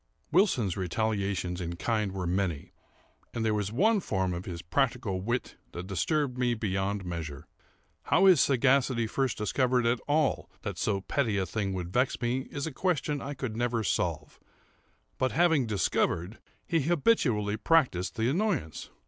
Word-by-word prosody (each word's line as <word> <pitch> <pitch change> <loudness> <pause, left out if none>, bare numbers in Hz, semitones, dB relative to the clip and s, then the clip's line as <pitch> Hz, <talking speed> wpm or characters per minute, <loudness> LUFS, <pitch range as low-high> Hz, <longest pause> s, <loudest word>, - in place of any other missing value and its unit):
Wilson's 150 - +3
retaliations 95 -2 -1
in 85 0 -4
kind 105 +2 -1
were 95 -1 -4
many; 90 -4 -2 0.6
and 115 -1 -1
there 110 - +2
was 105 -1 -1
one 210 - +3
form 95 - -1
of 85 +1 -5
his 85 -3 -6
practical 115 - 0
wit 120 +5 -3 0.2
that 85 +1 -6
disturbed 125 - -1
me 120 -1 +2
beyond 100 -2 -2
measure. 80 -4 -5 0.6
How 190 - +4
his 180 -7 +7
sagacity 130 -2 +3
first 130 +2 -1
discovered 125 +3 +1
at 120 +1 +2
all 150 0 +1
that - - -4
so 100 -3 0
petty 110 -1 0
a 95 - 0
thing 100 +2 -2
would 90 -1 -5
vex 125 +1 +1
me, 125 +2 -1
is 140 -1 -4
a 160 - -3
question 150 -2 -1
I 145 +1 -5
never 115 +1 -1
could - - -4
solve; 80 -6 -2 0.8
but, 130 0 +1
having 160 -7 +3
discovered, 95 -1 0 0.3
he 165 - +1
habitually 135 - +2
practised 125 - +2
the 115 -1 0
annoyance. 160 - -1
110 Hz, 155 wpm, -29 LUFS, 95-135 Hz, 0.8 s, his